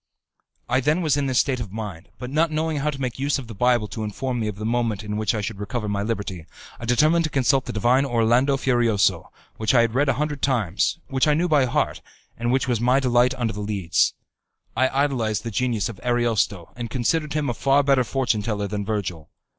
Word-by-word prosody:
I 130 Hz, -, +2 dB
then 150 Hz, +6 st, +1 dB
was 150 Hz, -4 st, +2 dB
in 140 Hz, -1 st, 0 dB
this 130 Hz, -2 st, 0 dB
state 130 Hz, -3 st, +2 dB
of 110 Hz, -5 st, -5 dB
mind; 100 Hz, -6 st, -7 dB
but 125 Hz, 0 st, -7 dB
not 160 Hz, +3 st, +2 dB
knowing 155 Hz, 0 st, -1 dB
how 145 Hz, +2 st, 0 dB
to 140 Hz, -2 st, -5 dB
make 130 Hz, -2 st, -3 dB
use 140 Hz, +1 st, +1 dB
of 135 Hz, -, -7 dB
the 115 Hz, -, -9 dB
Bible 120 Hz, 0 st, +2 dB
to 110 Hz, +2 st, -5 dB
inform 120 Hz, +4 st, -3 dB
me 110 Hz, -, -1 dB
of 105 Hz, -, -4 dB
the 105 Hz, +1 st, -6 dB
moment 115 Hz, -3 st, -1 dB
in 105 Hz, 0 st, -4 dB
which 110 Hz, 0 st, 0 dB
I 105 Hz, -, -1 dB
should 105 Hz, 0 st, -5 dB
recover 105 Hz, +2 st, -3 dB
my 100 Hz, -1 st, -1 dB
liberty, 100 Hz, -6 st, -4 dB, 0.3 s
I 115 Hz, -, -6 dB
determined 155 Hz, +8 st, +3 dB
to -, -, -2 dB
consult 135 Hz, -1 st, +2 dB
the -, -, -4 dB
divine 120 Hz, +5 st, +2 dB
Orlando 125 Hz, +2 st, +2 dB
Furioso, 120 Hz, -6 st, +1 dB, 0.3 s
which 110 Hz, +3 st, +1 dB
I 120 Hz, -, +7 dB
had 115 Hz, -1 st, +1 dB
read 140 Hz, +3 st, +2 dB
a -, -, +3 dB
hundred 150 Hz, +1 st, -2 dB
times, 110 Hz, -, +1 dB
which 135 Hz, +1 st, +1 dB
I 150 Hz, -, +4 dB
knew 170 Hz, +3 st, +1 dB
by 150 Hz, -5 st, +3 dB
heart, 120 Hz, -, -1 dB, 0.3 s
and 120 Hz, +1 st, -1 dB
which 130 Hz, +1 st, +1 dB
was 120 Hz, -3 st, 0 dB
my 125 Hz, +3 st, +3 dB
delight 125 Hz, 0 st, +2 dB
under 120 Hz, -3 st, -2 dB
the 105 Hz, -, -5 dB
Leads. 100 Hz, -5 st, +1 dB, 0.6 s
I 130 Hz, +2 st, +3 dB
idolized 130 Hz, -6 st, 0 dB
the 115 Hz, -, -4 dB
genius 115 Hz, -3 st, 0 dB
of 115 Hz, -5 st, -8 dB
Ariosto, 115 Hz, -7 st, 0 dB
and 120 Hz, -1 st, -5 dB
considered 150 Hz, +6 st, 0 dB
him 150 Hz, -2 st, -1 dB
a 120 Hz, -, 0 dB
far 135 Hz, +4 st, +2 dB
better 135 Hz, -2 st, +3 dB
fortune 120 Hz, -3 st, 0 dB
teller 105 Hz, -1 st, -2 dB
than 105 Hz, 0 st, -3 dB
Virgil. 100 Hz, -7 st, -4 dB
120 Hz, 230 wpm, -23 LUFS, 110-135 Hz, 0.6 s, I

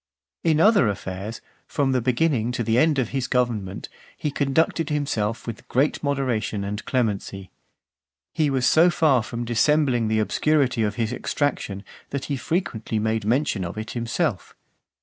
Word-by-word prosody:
XII. 165 Hz, -, +3 dB
In 155 Hz, -, +1 dB
other 205 Hz, -, +5 dB
affairs, 100 Hz, +2 st, -5 dB, 0.3 s
from 140 Hz, -2 st, 0 dB
the 130 Hz, -1 st, +1 dB
beginning 125 Hz, -1 st, +1 dB
to 120 Hz, -, -1 dB
the 115 Hz, +2 st, +2 dB
end 155 Hz, +1 st, +3 dB
of 125 Hz, -4 st, 0 dB
his 135 Hz, -2 st, -2 dB
government, 115 Hz, -7 st, -1 dB, 0.3 s
he 150 Hz, -, -2 dB
conducted 155 Hz, +3 st, +1 dB
himself 120 Hz, -7 st, -1 dB
with 115 Hz, -2 st, -7 dB
great 135 Hz, +4 st, +1 dB
moderation 130 Hz, -7 st, -1 dB
and 105 Hz, +1 st, -4 dB
clemency. 100 Hz, -6 st, -2 dB, 0.8 s
He 155 Hz, -3 st, +1 dB
was 130 Hz, -2 st, +1 dB
so 165 Hz, +6 st, +6 dB
far 150 Hz, -7 st, +3 dB
from 120 Hz, +2 st, -5 dB
dissembling 120 Hz, 0 st, +2 dB
the 110 Hz, 0 st, +1 dB
obscurity 130 Hz, +3 st, +1 dB
of 105 Hz, -2 st, 0 dB
his 115 Hz, -1 st, -1 dB
extraction, 105 Hz, -9 st, -2 dB, 0.3 s
that 140 Hz, -1 st, -4 dB
he 145 Hz, -, -2 dB
frequently 130 Hz, -, -2 dB
made 110 Hz, 0 st, 0 dB
mention 120 Hz, -3 st, +1 dB
of 85 Hz, +4 st, -6 dB
it 110 Hz, +1 st, -5 dB
himself. 120 Hz, 0 st, -2 dB
125 Hz, 160 wpm, -24 LUFS, 110-145 Hz, 0.8 s, so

